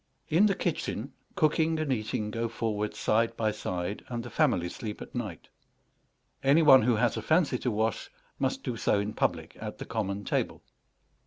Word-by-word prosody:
In 180 +7 +5
the 195 - +1
kitchen 145 - -2 0.2
cooking 160 -2 +2
and 155 -4 0
eating 110 -2 -2
go 115 +1 -2
forward 105 -2 -2
side 115 +1 +1
by 110 -1 +1
side, 90 0 -4
and 120 -1 -4
the 120 - -8
family 125 - +2
sleep 105 +4 -6
at - - -10
night. 105 -10 -5 0.9
Any 140 +4 +5
one 135 -4 +8
who 120 +1 +3
has 115 0 +1
a - - -2
fancy 155 -6 +2
to 125 - -1
wash 110 0 -1 0.3
must - - -1
do 120 - -3
so 105 - +2
in 105 +1 -2
public - - -1
at - - -5
the - - -6
common 100 -2 -3
table. - - -1
115 Hz, 180 wpm, -29 LUFS, 105-140 Hz, 0.9 s, one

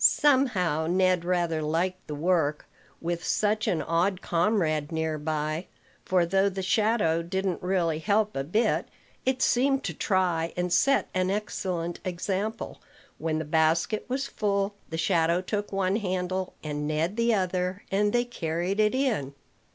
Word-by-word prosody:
Somehow 200 - +3
Ned 185 0 +2
rather 175 -3 0
liked 175 +4 -1
the 150 - -4
work, 155 -2 +1 0.3
with 170 0 -3
such 215 0 +1
an 165 - +1
odd 180 +3 +1
comrade 165 -5 +1
near 160 -1 -1
by; 155 +2 -2 0.4
for, 180 -2 +2
though 195 +3 +2
the 190 0 -4
shadow 205 -4 +2
didn't 190 +1 -2
really 175 -4 0
help 210 +4 +1
a 135 - -1
bit, 210 +11 +1 0.4
it 260 -1 +2
seemed 270 +2 +2
to - - -3
try, 175 -4 0
and 180 0 0
set 275 0 +3
an 185 0 +1
excellent 185 -4 -2
example. 190 +5 -3 0.4
When 160 -1 -1
the 160 - -3
basket 160 +6 +1
was 265 +2 -1
full, 200 -3 -1 0.2
the 160 - -4
shadow 165 0 +2
took 205 +2 -3
one 195 0 +1
handle, 185 -2 -2
and 150 -1 -3
Ned 160 +5 0
the 230 0 +2
other; 185 0 -1
and 205 +1 +2
they 240 +1 +2
carried 175 -3 -2
it 215 +3 +3
in. 215 - 0
185 Hz, 150 wpm, -27 LUFS, 165-205 Hz, 0.4 s, Somehow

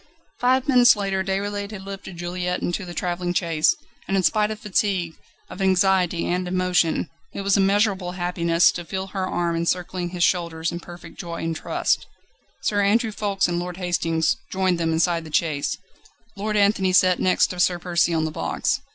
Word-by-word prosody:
Five 260 +2 +2
minutes 250 -3 +6
later 195 -2 -1
Déroulède 200 +1 -2
had 205 -3 -8
lifted 195 -2 -8
Juliette 180 +1 -3
into 180 +2 -2
the 175 - -8
travelling 175 0 -2
chaise, 165 -4 +2 0.3
and 195 - +1
in 190 - +1
spite 210 +3 +2
of 215 -1 -5
fatigue, 190 -5 0 0.3
of 190 - -8
anxiety, 185 -2 +2
and 180 +1 -1
emotion, 180 -3 +1 0.3
it - - -4
was 195 0 +2
immeasurable 195 -2 +2
happiness 175 -1 +2
to 175 - -6
feel 190 +3 -4
her 190 -2 -1
arm 170 -2 -1
encircling 175 +1 -1
his 175 -1 -2
shoulders 170 -2 0
in 170 - -5
perfect 175 0 -12
joy 170 -2 -5
and 165 0 -2
trust. - - -1 0.6
Sir 205 -1 +1
Andrew 220 +3 +2
Ffoulkes 205 -2 0
and 175 0 -1
Lord 180 0 -5
Hastings 165 -3 0
joined 185 -2 +1
them 165 -1 0
inside 165 +1 +1
the 155 - -11
chaise; 150 -2 0 0.6
Lord 210 +1 -2
Anthony 200 -2 +3
sat 185 -1 +4
next 185 - +2
to 180 - -7
Sir 180 0 +3
Percy 175 -1 +1
on 160 -1 +1
the 155 - -3
box. - - -1
180 Hz, 180 wpm, -23 LUFS, 175-195 Hz, 0.6 s, minutes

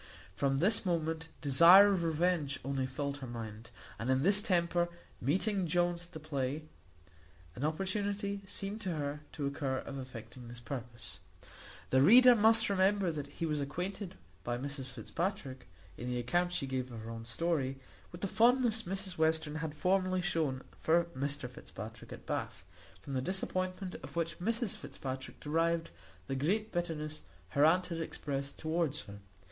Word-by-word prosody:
From 135 +4 +1
this 195 +9 +3
moment 165 -3 -1
desire 170 +8 +8
of 180 -3 0
revenge 160 -3 +1
only 135 -1 -1
filled 140 +2 -3
her 135 -2 -7
mind; 115 -1 -7 0.3
and 115 - -2
in 130 +1 +3
this 200 +3 +5
temper 175 -3 +2 0.3
meeting 190 - +1
Jones 175 +1 +1
at 175 - -25
the 160 - -6
play, 145 -1 -2 0.9
an 130 - -5
opportunity 200 +5 -1
seemed 200 +3 -3
to 185 -5 -2
her 145 0 -3
to 145 - -3
occur 140 -1 -1
of 135 +1 -5
effecting 125 -1 -9
this 120 0 -9
purpose. 120 -2 -7 0.7
The 130 - +5
reader 245 - +9
must 225 0 +5
remember 195 -1 +3
that 145 -3 -5
he 165 - -4
was 150 -2 0
acquainted 180 +7 -4 0.3
by 120 0 -1
Mrs 140 +1 -5
Fitzpatrick, 130 - -4 0.3
in 125 - -4
the 125 0 -1
account 175 +9 +1
she 175 -6 -1
gave 130 -1 -3
of 115 -2 -7
her 115 +1 -7
own 115 0 -6
story, 135 +2 -1 0.3
with 175 - -10
the 195 - 0
fondness 235 +1 +4
Mrs 190 -2 -3
Western 160 -1 +2
had 155 -1 -4
formerly 185 +2 +1
shewn 155 -7 0 0.2
for 170 +2 +4
Mr 140 0 -2
Fitzpatrick 110 -2 -10
at - - -9
Bath, - - -4 0.4
from 140 - -6
the 130 - 0
disappointment 185 +3 -2
of 135 +2 -10
which 165 0 -2
Mrs 230 +3 0
Fitzpatrick 130 -1 -6
derived 165 +2 0 0.3
the 135 - -3
great 205 +11 0
bitterness 155 -3 -3 0.3
her 140 +9 +2
aunt 180 +4 +5
had 165 -1 -3
expressed 140 -3 -4
toward 160 -2 0
her. 100 -8 -8
160 Hz, 165 wpm, -33 LUFS, 135-185 Hz, 0.9 s, reader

